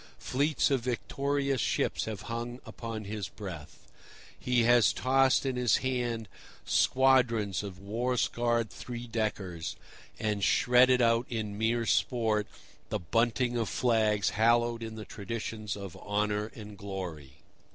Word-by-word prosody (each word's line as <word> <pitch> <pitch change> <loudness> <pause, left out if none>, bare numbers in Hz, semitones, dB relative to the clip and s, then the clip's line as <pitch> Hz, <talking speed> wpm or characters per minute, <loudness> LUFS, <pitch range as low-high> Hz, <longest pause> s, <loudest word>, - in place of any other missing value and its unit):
Fleets 145 +3 +1
of 135 - +3
victorious 140 +2 -1
ships - - 0
have 110 -4 -5
hung 120 +1 -5
upon 115 -2 -6
his 105 -1 -4
breath. 90 -8 -9 0.5
He 125 -2 +2
has 120 0 +5
tossed 135 +1 +3
in 130 -2 -1
his 125 -3 +3
hand 120 -4 -1 0.4
squadrons 125 -7 +3
of 100 -3 -7
war 115 +6 -2
scarred 120 -1 0
three 120 -1 -7
deckers, 105 -7 -3 0.4
and 105 -2 -1
shredded 125 +2 +5
out 115 +1 +3
in 110 -3 -3
mere 115 +2 +1
sport 110 -4 +1 0.4
the - - 0
bunting 120 +6 +1
of 115 -3 -1
flags 110 -5 +2
hallowed 115 +1 +2
in 110 -1 -6
the 110 -1 -7
traditions 110 0 -5
of 100 -4 -8
honour 105 0 -1
and 105 -3 -10
glory. 90 -9 -6
115 Hz, 130 wpm, -30 LUFS, 105-125 Hz, 0.5 s, has